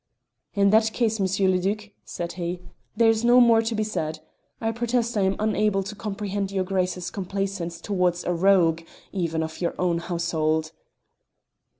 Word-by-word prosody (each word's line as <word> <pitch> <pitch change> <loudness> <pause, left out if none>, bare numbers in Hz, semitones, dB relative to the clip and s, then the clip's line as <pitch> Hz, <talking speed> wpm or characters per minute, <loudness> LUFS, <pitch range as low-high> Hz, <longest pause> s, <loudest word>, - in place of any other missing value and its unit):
"In 200 -1 +4
that 220 0 +4
case, 225 -3 0
M. 190 0 +2
le 185 - +2
Duc," 210 +3 -2
said 170 0 -5
he, 175 0 -4 0.4
"there 225 -1 +5
is 225 0 -1
no 240 +1 +6
more 230 -2 +6
to 225 0 -2
be 215 - 0
said. 160 -7 -3 0.4
I 225 0 0
protest 235 0 -1
I 205 - +2
am 190 0 +2
unable 210 -2 +1
to 195 +2 -6
comprehend 205 -1 -3
your 190 -1 0
Grace's 185 -1 -2
complacence 190 -3 -3
towards 180 -2 0
a 180 - 0
rogue 170 -2 +3 0.3
even 165 -4 -1
of 160 +2 -7
your 170 - -1
own 175 -2 +1
household." 160 -2 -1
195 Hz, 170 wpm, -25 LUFS, 175-215 Hz, 0.4 s, no